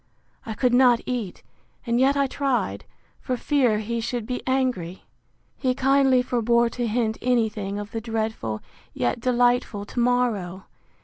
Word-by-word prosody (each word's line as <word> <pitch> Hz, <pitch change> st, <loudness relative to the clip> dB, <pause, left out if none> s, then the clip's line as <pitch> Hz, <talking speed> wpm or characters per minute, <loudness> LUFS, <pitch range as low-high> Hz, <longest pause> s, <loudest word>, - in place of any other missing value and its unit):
I 220 Hz, -, -4 dB
could 250 Hz, +2 st, +1 dB
not 245 Hz, -2 st, +5 dB
eat, 240 Hz, -7 st, -4 dB, 0.4 s
and 235 Hz, 0 st, +1 dB
yet 275 Hz, +2 st, +3 dB
I 280 Hz, -, +3 dB
tried, 245 Hz, -, -1 dB, 0.3 s
for 255 Hz, -, -3 dB
fear 250 Hz, -5 st, +2 dB
he 230 Hz, +2 st, -3 dB
should 235 Hz, -1 st, -3 dB
be 250 Hz, +2 st, -3 dB
angry. 250 Hz, -10 st, -1 dB, 0.5 s
He 255 Hz, -2 st, -1 dB
kindly 270 Hz, -1 st, +3 dB
forbore 235 Hz, -1 st, +2 dB
to 240 Hz, 0 st, -2 dB
hint 220 Hz, 0 st, -1 dB
any 245 Hz, -3 st, +2 dB
thing 205 Hz, -2 st, -5 dB
of 205 Hz, +1 st, -6 dB
the 225 Hz, -, -4 dB
dreadful, 220 Hz, -, -3 dB, 0.3 s
yet 120 Hz, -, -1 dB
delightful 245 Hz, -4 st, +1 dB
to 240 Hz, -, -5 dB
morrow! 230 Hz, -7 st, 0 dB
240 Hz, 150 wpm, -24 LUFS, 215-250 Hz, 0.5 s, not